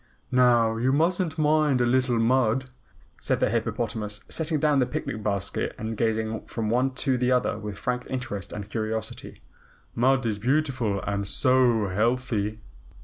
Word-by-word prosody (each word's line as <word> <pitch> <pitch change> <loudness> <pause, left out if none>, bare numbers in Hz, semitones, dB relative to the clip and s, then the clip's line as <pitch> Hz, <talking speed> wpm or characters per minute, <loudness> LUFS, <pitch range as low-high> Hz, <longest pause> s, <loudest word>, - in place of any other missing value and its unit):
"Now 120 -3 +4
you 125 +3 +1
mustn't 165 +2 +1
mind 150 -3 +3
a 120 - +3
little 125 0 +2
mud," 125 +1 +2 0.5
said - - 0
the - - +1
hippopotamus, 110 -2 -2
setting 160 -1 0
down 150 -1 +3
the 125 - +2
picnic 110 - -4
basket 100 -2 -2
and 110 +1 -4
gazing 110 0 -1
from 110 -2 -3
one 130 +2 +1
to 130 -3 +2
the 125 +1 +1
other 125 -3 +1
with 105 -2 -6
frank 125 +2 -2
interest 125 -8 -4
and 105 -1 -6
curiosity. 110 0 -5 0.5
"Mud 130 +1 +2
is 105 -2 -1
beautiful 125 -5 0
and 100 -1 -2
SO 120 -2 +3
healthy." 110 0 0
120 Hz, 150 wpm, -26 LUFS, 110-130 Hz, 0.5 s, Now